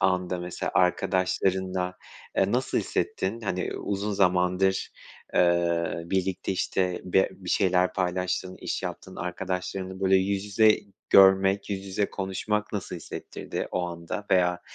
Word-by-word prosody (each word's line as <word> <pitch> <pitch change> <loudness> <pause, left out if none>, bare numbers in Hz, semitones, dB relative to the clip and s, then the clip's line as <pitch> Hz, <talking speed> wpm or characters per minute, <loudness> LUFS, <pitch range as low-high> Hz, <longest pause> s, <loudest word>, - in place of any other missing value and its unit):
anda 90 -1 +1
mesela 90 0 -4
arkadaşlarınla, 90 0 +1 0.4
eee, - - +2
nasıl - - +1
hissettin, 100 +5 -2
hani, 90 -4 -2
uzun 100 +1 -2
zamandır, 90 0 +2 0.4
eee, 85 -2 +2
birlikte, 95 +1 -1
işte, 90 -1 -1
be 95 +1 +3
bir 95 -2 -7
şeyler 90 -2 +3
paylaştığın, 90 0 -1
iş - - -3
yaptığın 95 - -6
arkadaşlarını 95 +1 -4
böyle 95 0 +4
yüz 95 +1 0
yüze 105 +1 +4 0.3
görmek, 95 +1 +6
yüz 100 -1 -3
yüze 100 +1 -1
konuşmak 105 +2 -2
nasıl 100 -4 -4
hissettirdi - - -6
o 90 - -1
anda 85 +4 -6
veya 90 -2 +3
95 Hz, 125 wpm, -27 LUFS, 90-95 Hz, 0.4 s, görmek